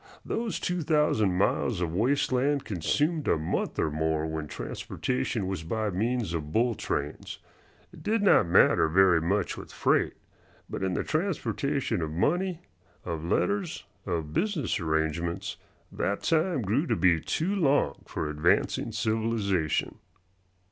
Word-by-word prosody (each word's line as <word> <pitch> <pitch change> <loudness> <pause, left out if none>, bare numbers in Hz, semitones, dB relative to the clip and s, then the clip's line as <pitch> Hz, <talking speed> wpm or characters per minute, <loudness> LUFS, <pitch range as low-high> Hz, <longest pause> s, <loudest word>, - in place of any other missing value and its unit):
Those 225 -2 -2
two 180 -1 -1
thousand 145 - +2
miles 100 +1 +1
of 85 -2 -2
waste 125 +11 +1
land 140 +2 +1
consumed 150 - 0
a - - +3
month 80 +1 -2
or 75 - +1
more 80 0 0
when 80 -1 -4
transportation 75 - -3
was 95 -3 -3
by 105 +6 -2
means 110 0 -1
of 75 -2 -4
bull 120 +4 +2
trains. 95 -9 -4 0.6
It - - -12
did 215 0 0
not 195 - +5
matter 85 - +5
very 90 0 +4
much 95 +3 0
with - - -9
freight, - - +1 0.5
but - - -5
in 95 -1 0
the - - 0
transportation 145 - -1
of 80 - -2
money, 170 - 0 0.4
of 80 -3 -4
letters, 185 - 0 0.2
of 80 -4 -2
business 175 - 0
arrangements 80 +1 -1 0.3
that 100 - -2
time 165 -4 +1
grew 110 - +1
to - - +1
be 90 -3 +4
too 170 - -1
long 140 - +2
for - - -3
advancing 75 +8 +1
civilization. 110 -6 0
105 Hz, 140 wpm, -28 LUFS, -, 0.6 s, not